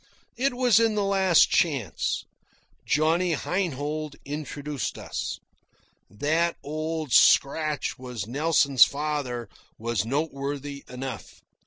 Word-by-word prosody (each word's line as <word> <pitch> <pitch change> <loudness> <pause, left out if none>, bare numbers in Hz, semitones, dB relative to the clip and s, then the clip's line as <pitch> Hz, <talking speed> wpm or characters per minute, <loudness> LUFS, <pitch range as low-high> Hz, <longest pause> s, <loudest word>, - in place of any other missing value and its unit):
It 260 +1 0
was 245 -4 +4
in 225 -2 +2
the 205 - +1
Last 190 -3 +4
Chance. 140 - 0 0.6
Johnny 165 +3 +2
Heinhold 155 -3 -3
introduced 145 -1 -4
us. - - -5 0.7
That 160 +10 0
Old 155 0 -4
Scratch 150 +2 +3
was 125 -5 -5
Nelson's 140 0 +4
father 140 -5 -2 0.3
was 115 -3 -1
noteworthy 140 +1 -3
enough. 130 +1 -7
150 Hz, 100 wpm, -26 LUFS, 135-165 Hz, 0.7 s, was